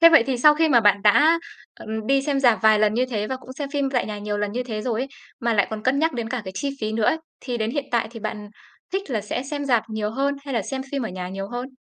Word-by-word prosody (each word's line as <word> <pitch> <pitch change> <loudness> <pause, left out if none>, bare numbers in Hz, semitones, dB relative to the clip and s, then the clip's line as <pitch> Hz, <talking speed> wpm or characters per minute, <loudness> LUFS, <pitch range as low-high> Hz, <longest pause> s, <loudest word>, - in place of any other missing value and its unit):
Thế 335 - +10
vậy 325 -7 +7
thì 265 -2 0
sau 300 +4 +7
khi 320 +1 +3
mà 245 -5 +5
bạn 205 -2 +4
đã, 300 +11 +5 0.4
ờ, - - -12 0.2
đi 275 +1 +3
xem 280 -1 0
rạp 240 -5 +4
vài 220 -1 +6
lần 215 0 +3
như 250 +2 +2
thế 210 -3 -1
và 260 - -3
cũng 255 0 -11
xem 280 +1 -5
phim 280 -2 0
tại 250 -3 0
nhà 210 -1 -5
nhiều 205 0 -3
lần 205 0 -2
như 250 +3 -1
thế 220 -4 -4
rồi 230 -2 -1
ấy, 270 - -3 0.3
mà 235 -1 +1
lại 205 -2 +3
còn 215 -1 -5
cân 255 +4 +2
nhắc 320 +2 +2
đến 235 -3 -3
cả 245 -2 -3
cái 190 - -6
chi 280 +8 -1
phí 215 0 -2
nữa 220 -1 0
ấy, 315 - +3 0.2
thì 245 -2 -3
đến 220 0 -1
hiện 285 +2 -2
tại 235 -1 +1
thì 230 -1 -9
bạn 210 -1 -5 0.4
thích 385 -5 -3
là 225 -4 0
sẽ 215 +5 -3
xem 285 +1 -4
rạp 240 -5 +3
nhiều 215 -1 -2
hơn 275 +4 0
hay 275 -2 -4
là 230 - +1
xem 265 +7 -4
phim 275 - -1
ở 225 - -2
nhà 180 0 -5
nhiều 195 +1 -5
hơn? 245 +3 -5
240 Hz, 310 wpm, -23 LUFS, 215-275 Hz, 0.4 s, Thế